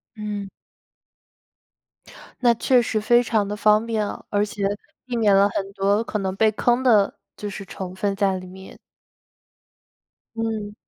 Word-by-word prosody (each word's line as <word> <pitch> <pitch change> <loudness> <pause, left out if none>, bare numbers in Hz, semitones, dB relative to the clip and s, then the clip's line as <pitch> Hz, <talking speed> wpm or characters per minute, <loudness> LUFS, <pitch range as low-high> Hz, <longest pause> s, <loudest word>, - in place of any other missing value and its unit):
嗯。 210 -2 -5 1.9
那 240 -2 +5
确 250 +2 +3
实 220 -2 -1
非 240 +3 +4
常 220 -3 0
地 205 - -3
方 210 0 +3
便， 220 -2 -1 0.2
而 205 0 +1
且 205 0 -8 0.4
避 250 -1 -4
免 215 -4 +4
了 200 +1 +5
很 195 -1 -4
多 200 +3 +1
可 215 - -3
能 190 -1 -2
被 220 +2 +3
坑 240 +4 +1
的 215 -6 +3 0.2
就 210 - -6
是 195 0 -7
成 185 -1 -7
分 200 +1 -1
在 195 -1 +1
里 185 - -8
面。 190 +1 -12 1.6
嗯。 220 -2 -3
210 Hz, 160 characters per minute, -23 LUFS, 195-225 Hz, 1.9 s, 那